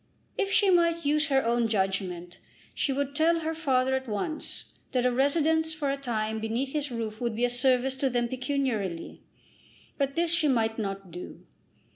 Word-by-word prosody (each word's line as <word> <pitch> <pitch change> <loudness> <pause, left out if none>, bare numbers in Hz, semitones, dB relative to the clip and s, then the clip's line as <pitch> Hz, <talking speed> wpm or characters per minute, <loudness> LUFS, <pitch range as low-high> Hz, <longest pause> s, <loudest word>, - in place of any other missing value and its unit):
If 395 -1 -1
she 395 -1 +4
might 335 -2 +3
use 300 +1 +2
her 270 -3 +2
own 235 0 +2
judgment 190 -4 -2 0.3
she 280 - 0
would 280 +1 -2
tell 330 +2 +3
her 320 0 -2
father 265 -5 +1
at 265 0 -1
once 220 +9 -4 0.2
that 250 -1 +1
a 250 - +4
residence 315 +4 +2
for 290 -3 -1
a - - 0
time 220 -5 -2
beneath 230 +5 -2
his 295 -1 -1
roof 225 -2 -5
would 235 -2 -1
be 240 +2 +2
a 245 - +1
service 255 +1 +3
to 270 0 +1
them 240 -1 0
pecuniarily. 250 - -2 0.8
But 275 0 0
this 335 0 +1
she 340 -2 +2
might 225 -4 +1
not 195 -3 -4
do. 175 +2 -9
260 Hz, 180 wpm, -28 LUFS, 225-295 Hz, 0.8 s, she